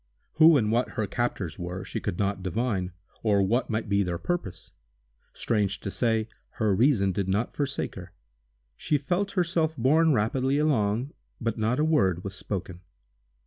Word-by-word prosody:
Who 160 -1 +8
and 110 -4 +1
what 120 +2 +1
her 110 - +1
captors 100 -8 -3
were, 90 +1 -5
she - - -4
could 85 - -3
not 100 -1 -1
divine, 95 0 -1 0.3
or 100 -3 +3
what 120 +7 0
might 110 0 -2
be 100 0 +2
their 90 -3 -1
purpose. 95 - -4 0.6
Strange 100 -4 -1
to 100 - -4
say, 115 -1 0 0.3
her 110 -3 +1
reason 110 -4 +3
did 95 0 -2
not 105 +5 -1
forsake 140 -1 -2
her. 90 -1 -10 0.6
She 150 - 0
felt 180 +8 -1
herself 165 -4 0
borne 155 +7 +4
rapidly 130 +3 +1
along, 125 -4 +1 0.3
but 115 -2 -2
not 115 +5 +1
a 155 - +3
word 95 - +2
was 100 - -5
spoken. 95 -3 -5
110 Hz, 165 wpm, -27 LUFS, 95-140 Hz, 0.6 s, Who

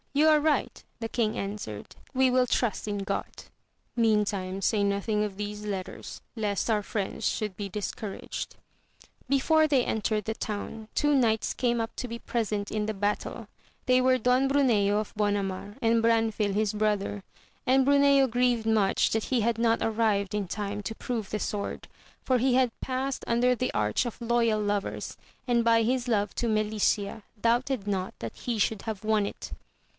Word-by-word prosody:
you 295 +2 +4
are 305 -1 +6
right, 300 -3 0 0.2
the 225 - -3
king 225 -2 -1
answered, 195 - -6 0.2
we 260 0 +4
will 255 0 +3
trust 230 -3 0
in 205 -1 -2
God. 195 -1 -4 0.5
Meantime, 205 -5 +1
say 205 +1 +2
nothing 200 +1 0
of 200 -2 -4
these 210 0 -5
letters, 195 -3 -5 0.2
lest 210 -1 -1
our 210 -2 +2
friends 200 -2 -3
should 210 -3 -1
be 200 +1 -5
discouraged. 205 +1 -5 0.7
Before 310 +3 +4
they 275 -5 +2
entered 215 -1 -1
the 220 - -1
town 215 0 -5
two 295 0 +3
knights 225 -5 +2
came 240 -2 0
up 225 0 -3
to 250 - -3
be 235 0 -6
present 210 -4 -2
in 210 -1 -1
the 220 - -2
battle, 205 +1 -2 0.4
they 255 0 +4
were 255 0 +4
Don 255 +3 +2
Bruneo 220 -8 +3
of 215 - -5
Bonamar, 205 0 -1
and 230 0 +3
Branfil 225 -3 +2
his 215 0 +1
brother; 210 -1 -1 0.4
and 265 +1 +4
Bruneo 280 -1 +5
grieved 245 -1 +1
much 215 -3 +2
that 220 -1 0
he 255 -3 +1
had 230 +1 0
not 230 -1 +3
arrived 215 -3 +1
in 205 -2 -1
time 205 +1 -3
to 220 +3 -4
prove 225 -5 -4
the 215 - -2
sword, 205 -1 -4 0.4
for 255 -1 +2
he 255 +1 +3
had 255 -3 +2
passed 265 +1 -2
under 240 +2 +3
the 255 +2 -2
arch 105 - +1
of 235 - -7
Loyal 235 -2 +2
Lovers, 205 -1 -2 0.3
and 240 -1 +3
by 230 0 +4
his 250 +2 0
love 205 -4 +1
to 235 - -1
Melicia 215 0 0 0.2
doubted 235 -1 +1
not 190 -2 -2
that 115 - -6
he 240 -2 -3
should 215 0 +1
have 220 -3 -5
won 215 -1 +2
it. - - -8
220 Hz, 175 wpm, -28 LUFS, 205-245 Hz, 0.7 s, are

